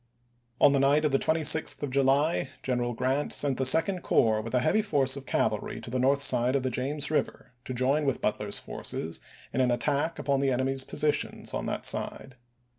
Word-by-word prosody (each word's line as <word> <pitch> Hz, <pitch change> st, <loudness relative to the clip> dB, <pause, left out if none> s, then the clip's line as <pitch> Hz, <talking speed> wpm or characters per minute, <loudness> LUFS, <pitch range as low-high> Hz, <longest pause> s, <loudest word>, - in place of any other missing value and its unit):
On 140 Hz, -, +5 dB
the 140 Hz, -, +2 dB
night 145 Hz, +3 st, +3 dB
of 150 Hz, -, +1 dB
the 135 Hz, -, +2 dB
26th 160 Hz, -1 st, +3 dB
of 140 Hz, -, -3 dB
July, 140 Hz, +2 st, +1 dB
General 120 Hz, -2 st, -1 dB
Grant 130 Hz, +5 st, -1 dB
sent 140 Hz, -3 st, +1 dB
the 130 Hz, -, +3 dB
Second 165 Hz, +6 st, +4 dB
Corps 110 Hz, -7 st, +2 dB
with 115 Hz, +3 st, -5 dB
a -, -, +3 dB
heavy 215 Hz, -, +1 dB
force 140 Hz, -10 st, 0 dB
of 140 Hz, -1 st, -10 dB
cavalry 105 Hz, -1 st, -1 dB
to 115 Hz, -, -9 dB
the 130 Hz, -, -1 dB
north 140 Hz, +2 st, +2 dB
side 125 Hz, 0 st, +2 dB
of 135 Hz, -, 0 dB
the 130 Hz, -, -1 dB
James 145 Hz, +4 st, -2 dB
Eiver, 150 Hz, -4 st, -3 dB
to -, -, -6 dB
join 135 Hz, +5 st, +1 dB
with 135 Hz, -2 st, -1 dB
Grant, 105 Hz, -, 0 dB
Butler's 105 Hz, -1 st, -4 dB
forces 80 Hz, +1 st, -5 dB, 0.3 s
in 130 Hz, -, 0 dB
an 125 Hz, -, +2 dB
attack 145 Hz, +6 st, -1 dB
upon 140 Hz, -1 st, -1 dB
the 135 Hz, 0 st, +1 dB
enemy's 130 Hz, +1 st, -1 dB
posi -, -, -4 dB
"Memoirs." 150 Hz, -1 st, +3 dB
tions -, -, -3 dB
on -, -, -3 dB
that -, -, -4 dB
side. 130 Hz, -, -2 dB
135 Hz, 215 wpm, -27 LUFS, 125-145 Hz, 0.3 s, On